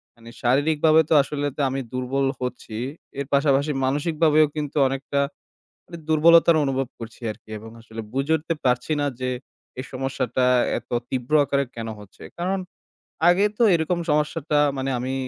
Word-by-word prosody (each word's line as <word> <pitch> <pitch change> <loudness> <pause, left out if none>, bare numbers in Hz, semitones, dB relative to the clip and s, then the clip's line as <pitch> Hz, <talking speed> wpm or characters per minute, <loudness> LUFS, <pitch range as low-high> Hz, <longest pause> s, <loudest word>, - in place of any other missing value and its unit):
মানে, 115 0 -14
শারীরিকভাবে 155 +5 +4
তো - - +3
আসলে 145 0 -3
তো - - -1
আমি 135 +1 -2
দুর্বল 130 +2 -1 0.2
হচ্ছি। 120 -3 -5 0.4
এর 140 - -3
পাশাপাশি 140 +1 +3
মানসিকভাবেও 155 +2 +3
কিন্তু 150 -1 -4
অনেকটা, 135 +1 -2 0.7
মানে, 170 - -9
দুর্বলতার 165 +1 +6
অনুভব 135 -2 -1
করছি 115 +1 -10
আর - - -7
কি। - - -19
এবং 110 +1 -11
আসলে 115 0 -8
বুঝে 135 +4 0
উঠতে 165 +2 -3
পারছি 125 +4 +1
না 145 - +1
যে, 130 0 -1 0.5
এই - - -6
সমস্যাটা 130 -1 -1 0.3
এত - - -16 0.2
তীব্র 130 +2 -4
আকারে 140 0 0
কেন 115 -1 -5
হচ্ছে। 105 -2 -14 0.2
কারণ 190 +2 0 0.7
আগে 180 +4 +4
তো - - +2
এরকম 170 +2 0
সমস্যাটা, 150 0 +1 0.2
মানে, 135 0 -2
আমি, 130 +2 -3
140 Hz, 155 wpm, -23 LUFS, 130-155 Hz, 0.7 s, দুর্বলতার